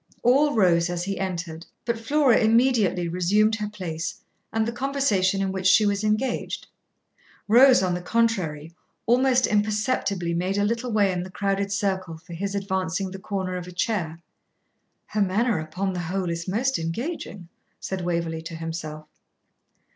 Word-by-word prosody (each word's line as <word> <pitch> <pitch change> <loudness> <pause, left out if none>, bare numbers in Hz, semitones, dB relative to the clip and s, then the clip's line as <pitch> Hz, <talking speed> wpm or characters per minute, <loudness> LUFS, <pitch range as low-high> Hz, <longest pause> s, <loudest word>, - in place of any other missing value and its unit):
All 280 +4 +4
rose 175 -5 +3
as 175 0 -2
he 195 +1 -3
entered, 170 -3 -4 0.2
but 235 -1 -1
Flora 270 +1 +3
immediately 225 -6 +3
resumed 195 +6 +2
her 210 -1 -3
place 170 -5 -5 0.3
and 225 0 +1
the - - -1
conversation 235 -8 +1
in 190 - -1
which 190 -1 -1
she 210 +3 +6
was 205 0 0
engaged. 215 +4 -1 0.8
Rose, 250 +1 +7
on 180 -1 +1
the 180 - -3
contrary, 175 -8 0 0.3
almost 255 +1 +4
imperceptibly 210 -4 0
made 185 +3 -1
a 205 - +2
little 235 +3 -1
way 205 -3 +3
in 180 -1 -2
the 185 - -7
crowded 195 +1 -1
circle 190 -5 -1
for 170 +2 -12
his 195 +4 -3
advancing 190 -1 -2
the 190 - -7
corner 190 -2 -3
of 180 -1 -5
a - - -8
chair. 180 -4 -2 0.9
'Her 210 - -2
manner, 205 +2 +1
upon 185 +5 -3
the 180 - -3
whole, 180 +1 -2
is 170 +1 -4
most 250 +8 0
engaging,' 195 - -4 0.3
said 190 -1 -4
Waverley 170 -2 -2
to 165 0 -7
himself. 160 -2 -6
195 Hz, 160 wpm, -25 LUFS, 175-220 Hz, 0.9 s, Rose